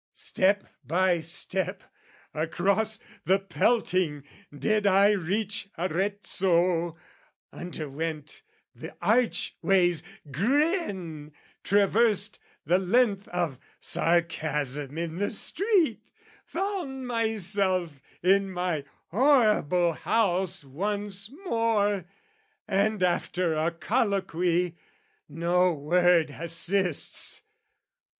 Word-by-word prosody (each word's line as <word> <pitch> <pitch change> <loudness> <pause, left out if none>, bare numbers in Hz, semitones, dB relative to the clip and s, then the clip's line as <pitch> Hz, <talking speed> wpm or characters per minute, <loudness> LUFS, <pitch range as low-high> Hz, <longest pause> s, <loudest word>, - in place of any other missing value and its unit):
Step 200 +2 +1 0.2
By 175 +5 +2
step, 180 +3 -3 0.5
across 200 +7 +1 0.3
the 190 +2 +4
pelting, 185 - 0 0.3
did 210 +8 0
I 200 +1 +5
reach 200 +2 -2
Arezzo, 175 -2 0 0.6
underwent 155 -2 -5 0.3
the - - -10
archway's 195 -7 +2 0.3
grin, 195 - -1 0.3
Traversed 205 0 +2 0.3
the 175 +5 +3
length 200 +1 +2
of 170 -7 -2 0.2
sarcasm 150 -4 0
in 165 0 -3
the 205 - 0
street, 350 - 0 0.4
Found 345 -9 -3
myself 195 - +1 0.2
in 195 +2 +3
my 180 -5 -2 0.2
horrible 210 - +3
house 190 -2 0
once 200 +7 -3 0.2
more, 210 - +1 0.6
And 205 0 +1
after 180 -1 0
a 155 +2 +1
colloquy...no 175 - -1
word 165 +1 +3
assists! 170 - 0
185 Hz, 75 wpm, -27 LUFS, 170-205 Hz, 0.6 s, I